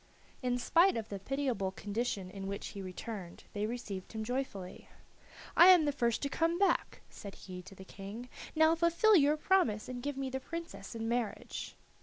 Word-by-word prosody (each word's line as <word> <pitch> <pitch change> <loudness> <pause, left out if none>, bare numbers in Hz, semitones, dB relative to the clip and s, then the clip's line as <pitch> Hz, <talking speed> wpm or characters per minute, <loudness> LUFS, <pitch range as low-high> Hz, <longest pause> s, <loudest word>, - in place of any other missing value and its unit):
In 250 -1 +1
spite 335 +6 +4
of 220 -1 -4
the 200 - -4
pitiable 250 -3 -1
condition 205 -1 -3
in 195 0 -6
which 200 0 -4
he 200 - -7
returned 185 -1 -7
they 210 0 -1
received 215 -5 -5
him 220 -1 -3
joyfully. 220 -6 -4 0.7
"I 345 - +9
am 360 -4 +8
the 290 - +2
first 235 -4 0
to - - +1
come 330 +4 +1
back," 395 +1 +1
said 200 -1 -10
he 180 -1 -8
to 185 +2 -13
the 190 - -11
King; 205 +6 -8 0.3
now 315 +1 +6
fulfil 340 +6 +4
your 300 -2 +5
promise, 300 - +2
and 250 -1 -5
give 285 +1 -3
me 270 -1 -2
the 265 - -2
princess 335 -3 -7
in 225 0 -3
marriage. 235 -2 -3
240 Hz, 185 wpm, -33 LUFS, 200-290 Hz, 0.7 s, I